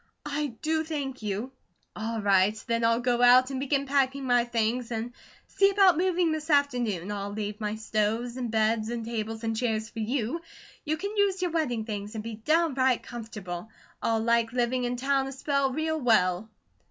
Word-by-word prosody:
I 295 0 -1 0.2
do 315 0 +1
thank 285 -5 -4
you." 210 +4 -3 0.4
"All 225 +1 -3
right, 200 +1 +4
then, 230 0 0
I'll 230 +1 +3
go 245 -1 +1
out 250 +2 +6
and 265 - -3
begin 275 0 0
packing 275 0 +1
my 245 -1 +3
things, 235 0 -1
and 235 +1 -4 0.3
see 395 0 +3
about 390 -2 +5
moving 355 -1 +2
this 315 0 -4
afternoon. 245 - +1
I'll 200 -1 -3
leave 210 +1 -5
my 210 0 -2
stoves, 220 +2 -1
and 250 -2 -3
beds, 220 0 +1
and 235 -1 -4
tables, 225 -1 -4
and 225 0 -1
chairs 220 -2 -1
for 230 - -7
you; 245 +7 -1 0.4
you 310 +1 0
can 400 +5 -4
use 390 -2 +2
your 355 - 0
wedding 250 -9 -1
things, 210 0 -5
and 215 - -4
be 230 0 -5
downright 265 0 +2
comfortable. 215 -5 -7 0.3
I'll 225 -1 +1
like 230 0 +2
living 250 0 0
in 245 0 -1
town 270 +1 +1
a - - -5
spell 275 0 0
real 315 +2 -1
well." 215 -4 +2
240 Hz, 185 wpm, -27 LUFS, 220-280 Hz, 0.4 s, out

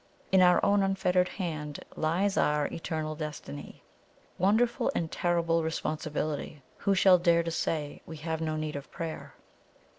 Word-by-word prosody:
In 190 -1 +6
our 180 -1 +6
own 200 0 +4
unfettered 185 -2 +2
hand 155 -6 -5
lies 185 +6 +1
our 150 0 +2
eternal 155 -2 -3
destiny. 150 - -7 0.6
Wonderful 225 +8 +2
and 165 -2 -1
terrible 170 -1 +1
responsibility! 155 -2 -3
Who 200 -1 +1
shall 185 -1 +6
dare 170 -1 +3
to 165 - -3
say 155 -2 -2
we 160 - -7
have 160 +1 -3
no 155 -1 -1
need 155 -1 -3
of 140 0 -7
prayer?" 165 -1 -6
165 Hz, 145 wpm, -29 LUFS, 155-180 Hz, 0.6 s, In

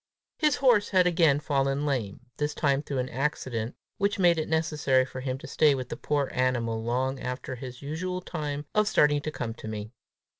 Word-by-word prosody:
His 300 -4 +3
horse 240 -7 +4
had 185 -2 +4
again 165 -5 +4
fallen 140 -1 0
lame 125 -9 -2 0.2
this 150 0 -1
time 140 -2 +2
through 145 -2 -4
an 125 0 -1
accident 130 -4 -2 0.2
which 200 +1 +1
made 175 -3 +4
it 155 - -3
necessary 150 -5 +2
for 130 0 -7
him 130 0 -2
to - - -11
stay 150 -3 +3
with 130 -2 -5
the - - -4
poor 145 -2 -1
animal 120 -3 0
long 130 +3 -1
after 125 +1 -4
his 125 +1 -8
usual 180 +5 -3
time 150 -5 -4
of 215 0 +3
starting 145 -6 +4
to 155 - -3
come 115 -6 -4
to 110 - -10
me. 110 0 -5
140 Hz, 195 wpm, -28 LUFS, 130-160 Hz, 0.2 s, horse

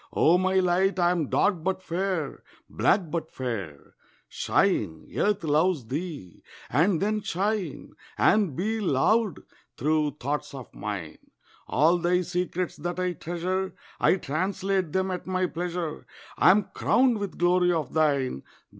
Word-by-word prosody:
O 175 +3 +4
my 185 +1 +1
light, 190 +1 +2
I 175 -1 +3
am 165 -6 -1
dark 190 -6 +1
but 190 +1 -1
fair, 175 -4 -2 0.3
Black 180 -6 +1
but 165 -2 -3
fair. 100 - -6 0.3
Shine, 105 - 0
Earth 205 -2 +1
loves 155 -2 +2
thee! 140 - -6 0.3
And 165 - +3
then 210 +2 0
shine 195 -4 -2 0.2
And 195 -8 +3
be 220 +7 -1
loved 200 - +2 0.4
through 150 0 0
thoughts 140 +2 -3
of 130 -4 -10
mine. 100 -6 -5 0.5
All 165 +6 +3
thy 180 +1 +2
secrets 180 -1 -2
that 175 +3 -4
I 180 -1 0
treasure 180 +3 -3 0.2
I - - +4
translate 185 +2 -1
them 190 +2 0
at 180 0 -5
my 185 0 0
pleasure. 175 -2 -4 0.3
I - - +5
am 200 +1 +4
crowned 250 -3 +3
with 200 -2 -5
glory 180 0 +3
of 160 -4 -2
thine. 140 - +1
175 Hz, 140 wpm, -26 LUFS, 150-190 Hz, 0.5 s, I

